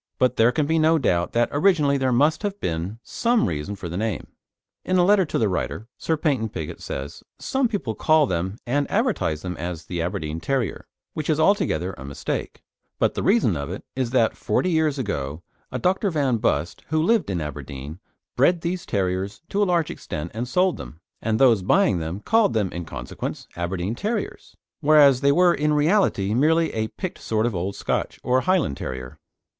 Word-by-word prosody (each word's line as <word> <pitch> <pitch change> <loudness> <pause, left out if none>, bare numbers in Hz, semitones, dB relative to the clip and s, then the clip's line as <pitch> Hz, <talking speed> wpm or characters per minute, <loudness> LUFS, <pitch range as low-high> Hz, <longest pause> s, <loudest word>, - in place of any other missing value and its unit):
But 125 -1 +2
there 115 +2 +4
can 145 +4 0
be 160 +2 +1
no 160 +1 +4
doubt 90 - 0
that 120 0 +2
originally 150 -3 +3
there 130 -2 +1
must 150 +6 +3
have 205 -1 -3
been 85 +6 -3
some 235 0 +1
reason 80 +4 -3
for 95 - -7
the 85 +1 -5
name. 110 -4 -2 0.6
In 185 - +1
a 175 - +5
letter 200 -1 +4
to - - -2
the 110 - +2
writer, 105 +4 -3
Sir 160 - 0
Paynton 135 -8 0
Pigott 80 -6 -6
says, 70 +1 -6 0.2
"Some 265 -1 0
people 200 - -3
call 155 +6 +3
them 95 -1 -2
and 140 +4 0
advertise 205 - 0
them 90 -1 -4
as 85 -1 -5
the 85 -2 -3
Aberdeen 80 -3 -3
Terrier, 130 +3 -2 0.3
which 155 0 -4
is 155 -1 +2
altogether 155 - +2
a - - -7
mistake; 70 +1 -5 0.3
but - - +2
the - - -3
reason 195 - +3
of 70 -2 -4
it - - -6
is 130 -2 -1
that 120 -3 +2
forty 185 - 0
years 160 -3 +2
ago 80 - -3 0.3
a - - -2
Dr. 190 +3 +1
Van 140 -7 +1
Bust, 85 -8 -1
who 155 +1 +1
lived 225 - +2
in 90 -3 -1
Aberdeen, 75 +1 -7 0.4
bred 175 -1 +3
these 175 +1 -3
terriers 95 - -2
to 205 - 0
a - - +4
large 170 -3 +1
extent 75 +3 -6
and 115 +3 -3
sold 180 +7 +2
them, 80 - -10 0.2
and 110 0 0
those 120 -6 +5
buying 175 - +3
them 80 +5 -4
called 225 - +3
them, 105 -5 0
in 85 -1 -5
consequence, - - -6
'Aberdeen 90 +3 -2
Terriers,' 210 - -4 0.2
whereas 145 -4 +6
they 140 0 +4
were 175 +3 +5
in 150 0 +1
reality 150 - +2
merely 160 +6 +3
a 110 0 -1
picked 185 - -6
sort 110 0 0
of 120 - 0
Old 95 +2 -3
Scotch - - -2
or 130 +1 +2
Highland 180 - +1
Terrier." 65 -1 -6
120 Hz, 195 wpm, -23 LUFS, -, 0.6 s, whereas